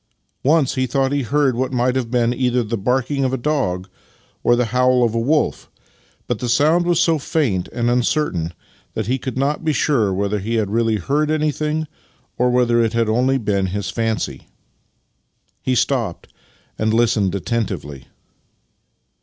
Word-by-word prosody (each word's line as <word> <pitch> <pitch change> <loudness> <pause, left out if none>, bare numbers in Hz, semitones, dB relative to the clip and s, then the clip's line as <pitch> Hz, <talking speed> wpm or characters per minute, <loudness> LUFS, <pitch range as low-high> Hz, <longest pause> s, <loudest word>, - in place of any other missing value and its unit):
Once 150 -1 +3
he 130 0 0
thought 135 +2 0
he 145 0 +1
heard 135 0 +1
what 130 +1 -1
might 125 0 +1
have 125 -3 -1
been 120 -1 +1
either 125 -1 +1
the 115 +1 -3
barking 130 +6 0
of 130 0 0
a - - +1
dog 120 -11 -1 0.6
or 120 - +4
the 125 0 +1
howl 125 0 +3
of 115 -2 +1
a 115 - 0
wolf, 150 +6 0 0.6
but 120 -4 -2
che 125 - -3
sound 155 +8 +3
was 175 -2 +2
so 165 -3 +3
faint 120 - 0
and 120 0 -2
uncertain 120 - 0 0.4
that 110 - -2
he 130 +5 -1
could 130 +1 -5
not 145 +4 0
be 160 - +1
sure 130 -9 +1
whether 100 +2 -1
he 110 +4 -2
had 105 -3 0
really 115 0 +1
heard 145 - 0
anything 155 0 0 0.5
or 125 0 +2
whether 120 -1 +3
it 115 -1 0
had 115 0 +2
been 110 0 0
only 130 +2 +2 0.3
his 100 +2 -3
fancy. 115 -1 -2 1.1
He 130 - 0
stopped 120 -8 -1 0.5
and 110 0 +1
listened 105 -5 +2
attentively. 100 - -3
125 Hz, 170 wpm, -20 LUFS, 110-135 Hz, 1.1 s, or